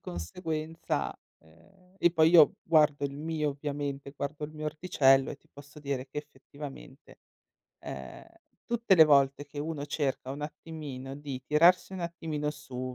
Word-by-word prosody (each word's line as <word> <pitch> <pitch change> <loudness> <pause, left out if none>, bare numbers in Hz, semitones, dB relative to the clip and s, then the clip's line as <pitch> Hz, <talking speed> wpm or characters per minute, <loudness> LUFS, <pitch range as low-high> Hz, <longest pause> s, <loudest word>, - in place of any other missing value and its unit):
conseguenza 155 - -4 0.3
ehm, 85 - -24
e 175 - +4
poi 160 -1 +4
io 165 -4 +7
guardo 150 -3 +3
il 140 0 -3
mio 155 -1 -1
ovviamente, 140 -1 -4
guardo 145 +2 -4
il 150 - -8
mio 155 0 -7
orticello 140 -4 +3
e - - -6
ti - - -31
posso 145 +1 -13
dire 140 -3 -3
che 150 - -5
effettivamente, 145 -1 -11 0.6
ehm, - - -8 0.4
tutte 235 -4 +3
le 160 -3 +9
volte 140 -1 +3
che 145 +1 -10
uno 145 -1 -4
cerca 140 -3 -2
un 140 +2 -5
attimino 150 -4 -7
di 140 -3 -6
tirarsi 170 +5 +4
un 185 - -5
attimino 160 -3 -3
su, 130 -4 -6
150 Hz, 155 wpm, -29 LUFS, 140-160 Hz, 0.6 s, le